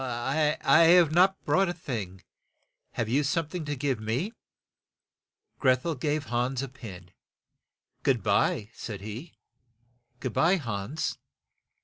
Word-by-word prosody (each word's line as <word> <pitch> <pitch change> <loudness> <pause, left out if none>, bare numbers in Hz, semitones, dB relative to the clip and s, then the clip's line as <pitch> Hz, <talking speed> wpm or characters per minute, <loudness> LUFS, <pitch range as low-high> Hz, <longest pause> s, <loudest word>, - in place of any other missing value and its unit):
"I 135 +5 0 0.3
have 170 -2 +6
not 185 +4 +3
brought 195 -1 +3
a - - -1
thing. 105 - -6 0.7
Have 115 - -2
you 135 +6 +2
some 155 +2 0
thing 175 -2 -5
to 145 0 -2
give 135 -3 -1
me?" 125 - -2 1.3
Greth 130 0 +3
el 165 - 0
gave 150 +2 -1
Hans 125 +2 -1
a - - -3
pin. 95 -9 -11 0.9
"Good 125 -7 +1
by," 105 - +1
said 105 -5 -7
he. 110 - -8 0.8
"Good 125 -1 -4
by, 175 +4 +4
Hans." 120 - -3
130 Hz, 130 wpm, -28 LUFS, 115-160 Hz, 1.3 s, have